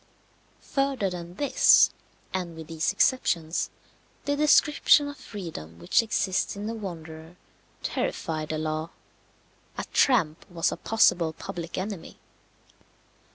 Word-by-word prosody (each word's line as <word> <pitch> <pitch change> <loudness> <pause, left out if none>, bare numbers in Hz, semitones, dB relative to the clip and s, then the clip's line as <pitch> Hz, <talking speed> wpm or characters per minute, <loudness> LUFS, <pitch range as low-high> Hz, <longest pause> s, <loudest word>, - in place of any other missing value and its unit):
Further 275 -8 +1
than 175 0 -7
this, 285 +6 +5 0.4
and 180 -3 -3
with 160 - -8
these 160 0 -1
exceptions, 170 -10 +1 0.6
the 285 - +1
description 295 0 +5
of 285 - -6
freedom 165 - -8
which 85 - +3
exists 200 -5 -1
in 200 +1 -6
the 225 - -3
wanderer 165 -5 -8 0.5
terrified 155 -1 -2
the 155 - -2
law. 155 +1 -2 0.9
A - - -2
tramp 170 - +3
was 170 -2 0
a - - -4
possible 175 -7 +3
public 170 +1 -6
enemy. 190 -3 -5
175 Hz, 115 wpm, -26 LUFS, 160-225 Hz, 0.9 s, this